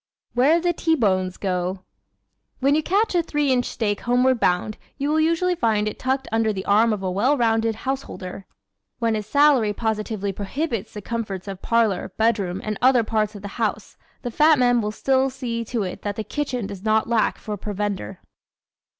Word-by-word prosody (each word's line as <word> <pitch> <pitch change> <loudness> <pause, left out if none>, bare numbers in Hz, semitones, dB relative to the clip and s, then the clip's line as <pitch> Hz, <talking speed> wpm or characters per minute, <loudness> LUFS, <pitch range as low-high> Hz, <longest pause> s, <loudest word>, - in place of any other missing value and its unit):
Where 280 +7 +4
the 350 0 +1
T 325 0 +1
Bones 185 - 0
Go 185 -1 -2
¶ - - -40 0.8
When 275 +2 +3
you 310 - +3
catch 400 +8 +1
a 350 - +3
three 295 -4 0
inch 250 -1 +2
steak 205 -3 -2
homeward 250 +1 +2
bound 180 +4 0 0.2
you 280 +1 -1
will 310 +1 +2
usually 335 +3 +2
find 220 -10 +1
it 215 - -5
tucked 265 +1 -1
under 225 -1 +2
the 190 -2 -5
arm 220 +3 +4
of 205 -2 -2
a 185 - -1
well 245 +10 +2
rounded 225 -2 +1
householder. 210 -7 -5 0.5
When 230 -2 +1
his 215 -1 -3
salary 275 -5 +4
positively 215 -2 -2
prohibits 220 - -4
the 210 - -6
comforts 210 -5 -4
of 195 -1 -6
parlor, 225 -5 +1
bedroom 205 -5 +1
and 215 -1 -3
other 255 -2 +5
parts 215 -1 -1
of 205 - -9
the - - -4
house 210 -1 -2 0.3
the 245 - -3
fat 305 +5 +5
man 245 -2 +3
will 210 - -2
still 265 +4 +1
see 245 -3 -4
to 225 -1 -2
it 185 - -5
that 205 -1 -3
the 220 - -3
kitchen 250 0 -3
does 195 -1 -7
not 220 +1 +2
lack 230 -2 +1
for 210 - -5
provender. 205 - -4
225 Hz, 195 wpm, -23 LUFS, 205-260 Hz, 0.8 s, other